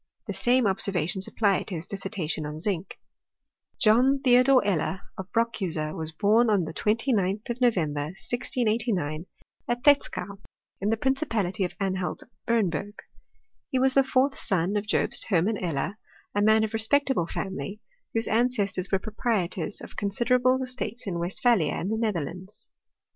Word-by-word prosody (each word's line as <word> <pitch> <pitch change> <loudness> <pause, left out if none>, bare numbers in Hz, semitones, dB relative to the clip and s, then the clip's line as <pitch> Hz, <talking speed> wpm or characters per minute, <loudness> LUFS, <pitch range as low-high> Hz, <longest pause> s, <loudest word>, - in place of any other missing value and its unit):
The - - -4
same 245 0 +3
observations 190 -2 0
apply 200 -4 +1
to 185 - -6
his 165 +1 -6
dissertation 195 -6 -4
on 150 +1 -5
zinc. 185 0 -3 0.8
John 250 +5 +4
Theodore 255 -1 +5
Eller, 190 -1 0
of 190 0 -8
Brockuser, 185 -10 -1
was 160 -1 -4
born 215 +8 +3
on 200 -4 +3
the 160 - -6
29th 210 0 0
of 240 +2 -6
November, 155 -12 +1
1689, 215 - -1 0.4
at 240 0 -2
Pletzkau, 200 -9 +2 0.4
in 200 - 0
the 225 - +1
prin 265 +4 +2
cipality 220 - -1
of 175 - -6
Anhalt 190 -2 -2 0.2
Bernburg. 205 -3 0 0.7
He 260 - 0
was 260 +1 +4
the 275 - +5
fourth 270 +1 +2
son 190 -1 0
of 205 0 -1
Jobst - - +2
Hermann 200 +2 +1
Eller, 175 +6 -2 0.3
a 205 - +1
man 220 +1 +5
of 220 - -1
a - - -16
respectable 225 -3 +2
family, 190 +1 -5 0.3
whose 225 0 0
ancestors 215 -5 0
were 195 - +4
proprietors 205 -4 -2
of - - -11
consider 235 +5 +1
able 255 +1 +3
estates 250 -2 -5
in 175 -4 -3
Westphalia 180 0 +2
and 190 - -3
the 220 - -1
Netherlands. 185 -1 -4
205 Hz, 155 wpm, -26 LUFS, 180-240 Hz, 0.8 s, Theodore